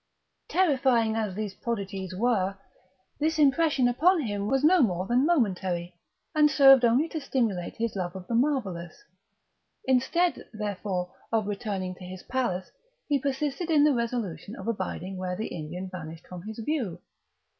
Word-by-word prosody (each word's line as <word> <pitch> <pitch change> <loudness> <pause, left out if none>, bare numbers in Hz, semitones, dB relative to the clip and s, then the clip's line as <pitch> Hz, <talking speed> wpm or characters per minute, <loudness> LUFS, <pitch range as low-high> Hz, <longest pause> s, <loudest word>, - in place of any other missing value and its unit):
Terrifying 260 -10 +2
as 215 -4 -2
these 210 -2 -3
prodigies 195 -5 -4
were, 200 -3 +1 0.6
this 315 +1 +1
impression 285 -2 +4
upon 325 +8 +3
him 205 -5 -2
was 270 +4 +1
no 350 +3 +6
more 185 -6 +1
than 245 +7 +2
momentary, 185 - 0 0.4
and 300 -1 +5
served 270 -2 +7
only 245 +7 +4
to 315 - -4
stimulate 225 -10 -1
his 230 -1 -2
love 180 -1 -3
of 185 -1 -7
the 235 - -4
marvellous. 230 - -1 0.8
Instead, 265 +8 +2
therefore, 200 -4 -3 0.2
of 220 -2 +1
returning 200 -3 -3
to 180 - -13
his 180 0 -8
palace, 190 -8 -2 0.4
he 285 -2 +2
persisted 285 +5 -2
in 300 -3 +5
the 300 -1 +5
resolution 235 -4 -3
of 270 - -8
abiding 190 -3 -3
where 185 -1 -3
the 215 +4 -4
Indian 175 +3 -6
vanished 165 -3 -8
from 180 -1 -9
his 220 - -7
view. 230 - -2
225 Hz, 155 wpm, -27 LUFS, 185-270 Hz, 0.8 s, served